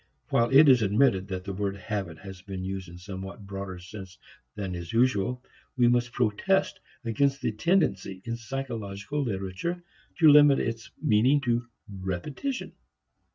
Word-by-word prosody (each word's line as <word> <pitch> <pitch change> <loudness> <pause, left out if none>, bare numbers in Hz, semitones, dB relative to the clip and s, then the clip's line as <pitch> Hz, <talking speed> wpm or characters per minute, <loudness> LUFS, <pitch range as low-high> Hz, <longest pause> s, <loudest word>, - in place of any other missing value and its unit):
While 115 0 +3
it 140 +3 +7
is 130 -3 +6
admitted 100 -2 +3
that 95 -1 -4
the 100 0 -5
word 100 0 -2
habit 95 -4 -4
has 95 +2 -10
been 95 -1 -6
used 95 -1 -5
in 85 - -11
a - - -10
somewhat 95 +3 -8
broader 95 -1 -6
sense 95 +1 -10 0.4
than 100 -3 -4
is 85 -1 -6
usual, 125 0 +1 0.3
we 120 -1 +5
must 120 0 +2
protest 125 - +1 0.3
against 140 +4 +1
the - - -1
tendency 105 - 0
in 115 0 -2
psychological 120 0 -4
literature 110 - -3 0.3
to 165 - +6
limit 145 -1 +8
its 115 0 -3
meaning 120 +7 +4
to 120 -2 0 0.2
repetition. 100 - -4
105 Hz, 155 wpm, -27 LUFS, 95-130 Hz, 0.4 s, limit